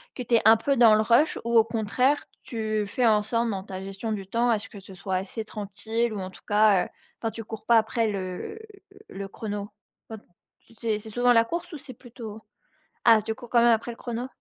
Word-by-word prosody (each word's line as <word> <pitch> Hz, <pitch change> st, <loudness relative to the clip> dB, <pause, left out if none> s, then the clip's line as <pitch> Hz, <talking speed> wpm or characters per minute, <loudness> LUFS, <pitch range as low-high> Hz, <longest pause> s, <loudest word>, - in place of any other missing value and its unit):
que 250 Hz, -, -4 dB
tu 240 Hz, 0 st, +2 dB
es -, -, +4 dB
un 220 Hz, -, +9 dB
peu 275 Hz, +5 st, 0 dB
dans 230 Hz, -3 st, +7 dB
le 215 Hz, -, +3 dB
rush 235 Hz, +8 st, +3 dB
ou 235 Hz, 0 st, +2 dB
au 220 Hz, -, +6 dB
contraire, 235 Hz, +6 st, +1 dB, 0.2 s
tu 215 Hz, -2 st, -2 dB
fais 245 Hz, +4 st, 0 dB
en 215 Hz, -2 st, +4 dB
sorte 230 Hz, +2 st, -1 dB
dans 190 Hz, -2 st, -3 dB
ta 190 Hz, -2 st, -7 dB
gestion 195 Hz, +3 st, -4 dB
du 195 Hz, -2 st, -5 dB
temps 235 Hz, +5 st, 0 dB
à 225 Hz, -, +3 dB
ce -, -, -8 dB
que 205 Hz, -, -11 dB
ce 195 Hz, 0 st, -13 dB
soit 190 Hz, 0 st, -4 dB
assez 195 Hz, +4 st, -3 dB
tranquille 220 Hz, +2 st, -3 dB
ou 205 Hz, -, -4 dB
en 185 Hz, -, -5 dB
tout -, -, -16 dB
cas, 205 Hz, -3 st, +4 dB
heu, -, -, -11 dB, 0.3 s
quand 225 Hz, -, -2 dB
tu 225 Hz, -, -7 dB
cours 220 Hz, 0 st, -9 dB
pas 235 Hz, -1 st, +5 dB
après 225 Hz, +1 st, +1 dB
le 195 Hz, -, -5 dB, 0.5 s
le 195 Hz, 0 st, -6 dB
chrono? 205 Hz, 0 st, -5 dB, 0.4 s
Enfin, 220 Hz, -2 st, -8 dB, 0.4 s
tu -, -, -21 dB
sais, 220 Hz, -1 st, -1 dB
c'est 215 Hz, +1 st, -9 dB
souvent 245 Hz, +2 st, +3 dB
la 230 Hz, -, +5 dB
course? 340 Hz, +9 st, -5 dB
Ou 310 Hz, -, -5 dB
c'est 260 Hz, -1 st, -10 dB
plutôt 225 Hz, -3 st, -10 dB, 0.6 s
ah 225 Hz, -2 st, +6 dB
tu 220 Hz, +1 st, -2 dB
cours 240 Hz, 0 st, -12 dB
quand 245 Hz, -, +1 dB
même 240 Hz, -, +6 dB
après 225 Hz, +2 st, -2 dB
le 230 Hz, -, -11 dB
chrono? 240 Hz, +1 st, -4 dB
220 Hz, 240 wpm, -26 LUFS, 205-235 Hz, 0.6 s, un